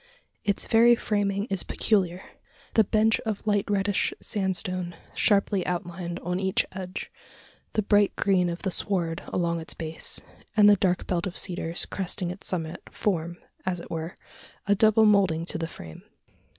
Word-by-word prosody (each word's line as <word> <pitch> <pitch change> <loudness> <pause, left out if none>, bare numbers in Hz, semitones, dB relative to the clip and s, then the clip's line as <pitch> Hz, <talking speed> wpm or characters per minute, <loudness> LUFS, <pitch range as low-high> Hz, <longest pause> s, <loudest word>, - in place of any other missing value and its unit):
Its 200 -1 0
very 235 +1 +6
framing 205 -2 0
is 195 -3 +1
peculiar. 185 -4 0 0.5
The 220 - +6
bench 220 +2 +2
of 220 -2 -4
light 205 -2 +1
reddish 200 -1 +1
sandstone 185 -3 -2 0.2
sharply 200 -2 +2
outlined 175 0 -3
on 180 +1 -2
each 190 -1 +1
edge 185 0 -6 0.6
the 215 - +1
bright 205 0 +3
green 185 -3 +2
of 170 +1 -5
the 190 - 0
sward 175 -3 -1
along 170 -1 0
its 160 - -7
base 160 -1 -4 0.4
and 210 -1 +8
the 205 - +8
dark 180 -2 +1
belt 175 +1 -1
of 185 - -6
cedars 175 -2 -1
cresting 180 -2 -3
its 185 - -9
summit, 165 -3 -3
form, 170 -4 -1 0.3
as 185 -2 -1
it - - -10
were, 165 +1 -4 0.5
a 205 - +4
double 220 +1 +5
moulding 190 -6 +3
to 160 - -2
the 165 - -2
frame. 80 - -10
185 Hz, 160 wpm, -26 LUFS, 175-205 Hz, 0.6 s, and